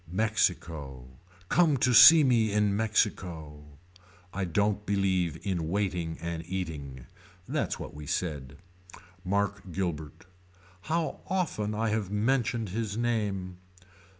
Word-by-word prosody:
Mexico. 80 - -1 0.4
Come 160 - +3
to 125 0 +2
see 160 +6 +10
me 115 -5 +3
in 105 -1 +2
Mexico. 90 -8 -1 0.7
I 95 0 -2
don't 105 +4 0
believe 95 -5 0
in 85 -5 -2
waiting 90 -4 -2
and 85 -1 -4
eating. 75 -9 -5 0.4
That's - - -2
what - - -7
we 75 0 -9
said. 70 -6 -3 0.7
Mark 100 0 -2
Guilbert. 80 -3 -4 0.6
How 165 0 -1
often 130 - -1
I 110 +1 0
have 105 -3 -1
mentioned 115 0 0
his 105 +1 -3
name. 105 -6 -2
100 Hz, 115 wpm, -28 LUFS, 85-110 Hz, 0.7 s, see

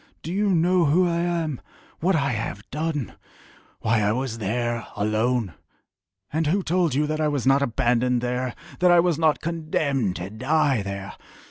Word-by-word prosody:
Do 165 - -4
you 205 +1 +1
know 175 0 +3
who 175 +5 +3
I 170 0 0
am 170 -5 -1 0.4
what 185 +3 +2
I 140 -4 +1
have 105 -3 -4
done 150 - -2 0.7
why 110 0 +2
I 105 0 +2
was 120 -1 -2
there 120 +2 -2
alone? 110 0 0 0.8
And 160 0 +1
who 190 +5 +1
told 170 -5 +1
you 150 +2 +2
that 155 +1 -2
I 155 - +2
was 145 -4 -1
not 135 +1 +4
abandoned 125 -1 +1
there 125 +1 -2 0.2
that 180 - +4
I 175 0 +6
was 170 -2 +2
not 160 -2 +2
condemned 155 - -1
to 90 +2 -6
die 135 +1 +1
there?... 100 0 -6
140 Hz, 170 wpm, -24 LUFS, 115-165 Hz, 0.8 s, I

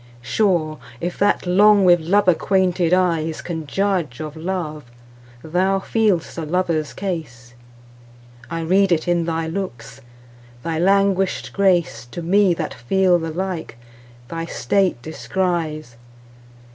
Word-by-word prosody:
Sure, 160 - 0 0.2
if 175 +1 -3
that 205 -1 +2
long 200 +2 +5
with 175 -1 +6
love 190 +5 +2
acquainted 180 -1 +2
eyesCan 165 -2 0
judge 180 -7 -1
of 155 -1 -6
love, 160 -3 -4 0.6
thou 185 +4 +1
feel'st 195 -4 0
a - - -2
lover's 160 -2 -1
case:I 120 -4 -9
read 190 +4 +2
it 165 -1 +1
in 175 -1 +1
thy 165 -1 -2
looks; 160 - -6 0.6
thy 165 -1 -2
languish'd 195 +1 +1
graceTo 175 -7 0
me, 190 +1 +3
that 160 -2 -4
feel 180 +8 +2
the 165 0 -4
like, 175 -6 -4 0.5
thy 165 +3 -4
state 180 +2 0
descries. 160 -6 -3
170 Hz, 115 wpm, -21 LUFS, 155-190 Hz, 0.6 s, with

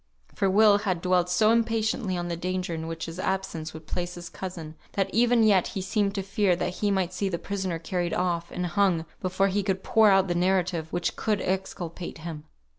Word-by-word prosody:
For 195 - +1
Will 205 +1 +6
had 185 -4 -1
dwelt 180 0 +2
so 215 +4 +4
impatiently 225 -3 +1
on 175 0 -3
the 170 - -2
danger 180 0 -3
in 160 0 -4
which 165 0 -4
his 165 +2 -7
absence 185 -5 -2
would 160 0 -10
place 175 +2 -4
his 175 -1 -8
cousin, 170 -5 -7 0.2
that 195 -1 -1
even 240 0 +4
yet 200 -4 +4
he - - -1
seemed 200 +1 0
to 195 - -2
fear 195 -1 +2
that 180 +1 -3
he 205 - +1
might 190 -2 0
see 195 +2 -1
the 170 - -2
prisoner 190 -1 -3
carried 175 +1 -2
off, 175 -2 -1
and 180 - -3
hung, 175 -3 +1 0.2
before 185 +2 +1
he 200 +2 +1
could 190 -1 -2
pour 220 -1 +5
out 195 -1 +4
the 175 - 0
narrative 180 -2 0
which 175 0 0 0.2
would 210 -2 +2
exculpate 180 -2 -4
him. 160 -2 -7
185 Hz, 210 wpm, -27 LUFS, 175-200 Hz, 0.2 s, Will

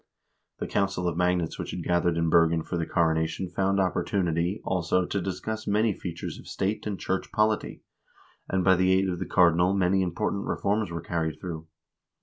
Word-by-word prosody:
The - - -4
council 95 -3 0
of 85 - -1
magnates 90 -1 0
which - - -4
had 90 - -5
gathered 85 -1 +1
in 85 -1 +1
Bergen 85 -1 +4
for 90 - -4
the 85 -1 -1
coronation 80 +1 0
found 95 +2 0
opportunity, 90 -1 0
also, 90 0 +1
to 100 - -2
discuss 110 +4 -4
many 105 +1 +2
features 85 -2 -6
of - - -13
state 100 +3 -2
and 100 -3 -3
church 95 0 -2
polity, 105 0 0 0.7
and 95 -1 +1
by 95 0 +5
the 95 +1 +3
aid 95 +1 +3
of 90 -1 -3
the 95 - -4
cardinal 90 +1 +4
many 95 0 +2
impor 85 -2 -1
tant 100 - -3
reforms 105 0 0
were 85 -1 -4
carried 80 -2 -2
through. 80 -3 -6
90 Hz, 185 wpm, -27 LUFS, 85-95 Hz, 0.7 s, by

